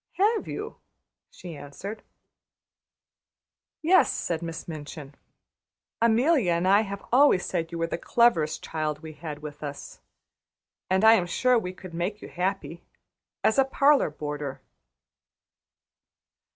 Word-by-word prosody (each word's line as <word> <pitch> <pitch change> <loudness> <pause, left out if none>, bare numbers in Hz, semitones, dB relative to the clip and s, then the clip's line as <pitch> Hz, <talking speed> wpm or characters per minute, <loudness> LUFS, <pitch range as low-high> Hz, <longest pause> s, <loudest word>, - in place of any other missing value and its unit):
"Have 425 +3 +1
you?" - - -6 0.5
she 175 -3 -10
answered. 145 +10 -8 1.8
"Yes," 365 +4 +5
said 165 -1 -2
Miss 165 -1 -6
Minchin. 150 -2 -8 0.9
"Amelia 235 - +3
and 170 +2 0
I 200 +2 +6
have 200 -2 -6
always 255 -7 +5
said 165 -3 -2
you 170 - -5
were 165 - 0
the 165 - -4
cleverest 170 -12 +2
child 155 -1 -3
we 160 -1 -8
had 150 -1 -8
with 150 -1 -8
us, 145 -1 -7 0.9
and 190 +3 +3
I 220 - +9
am 185 -6 +2
sure 250 +6 +2
we 180 -4 -5
could 185 -1 -11
make 180 +5 -3
you - - -10
happy 180 -2 -3 0.6
as 220 - +3
a - - +7
parlor 275 - +3
boarder." 145 -2 -5
175 Hz, 130 wpm, -26 LUFS, 155-220 Hz, 1.8 s, I